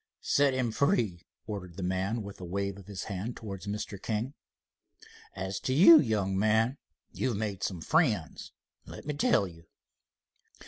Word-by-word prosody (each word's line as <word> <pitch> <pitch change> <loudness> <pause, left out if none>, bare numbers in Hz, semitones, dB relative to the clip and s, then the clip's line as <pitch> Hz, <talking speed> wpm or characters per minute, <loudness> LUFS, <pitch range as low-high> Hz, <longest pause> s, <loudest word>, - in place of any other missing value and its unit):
"Set 140 -2 +3
him 125 -3 0
free," 110 - +1 0.2
ordered 90 -5 -6
the 95 - -4
man 95 +5 -1
with 100 -1 -9
a - - -6
wave 100 +2 -2
of 100 -1 -13
his 100 -2 -5
hand 105 +4 -5
towards 100 -3 -7
Mr. 100 -1 -4
King. 115 +5 -2 1.0
"As 95 0 -3
to 130 - -1
you, 165 0 +10
young 105 -8 0
man, 110 +6 +2 0.3
you've 125 -5 -1
made 105 -3 -3
some 90 -4 -3
friends, 110 - 0 0.4
let - - -10
me 150 - -2
tell 140 -8 +3
you." 85 -1 -14
105 Hz, 155 wpm, -30 LUFS, 95-120 Hz, 1.0 s, you